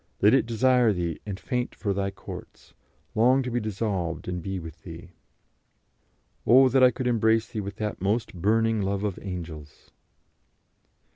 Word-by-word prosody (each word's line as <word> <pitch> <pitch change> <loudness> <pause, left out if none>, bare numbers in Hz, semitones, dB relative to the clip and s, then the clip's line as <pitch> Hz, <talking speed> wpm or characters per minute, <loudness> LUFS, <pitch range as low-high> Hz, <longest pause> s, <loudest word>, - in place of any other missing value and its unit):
Let 105 +4 +5
it 135 -3 +3
desire 125 -1 +3
Thee 85 -3 -3
and 100 -2 -5
faint 125 -1 -3
for 100 -3 -2
Thy 100 0 -1
courts; 95 0 -11 0.4
long 125 +4 +4
to 125 - -4
be 120 - 0
dissolved 100 -6 -3
and 90 -1 -3
be 95 +2 -4
with 80 -2 -9
Thee." 85 +1 -10 1.3
"Oh, 130 +2 +6
that 130 +1 +3
I 130 - +8
could 125 +1 -5
embrace 115 -2 +2
Thee 110 - -4
with 100 0 -6
that 105 -3 -4
most 105 +5 0
burning 110 +4 +1
love 100 +1 -1
of 100 -3 -2
angels." 80 -6 -8
105 Hz, 160 wpm, -26 LUFS, 95-115 Hz, 1.3 s, I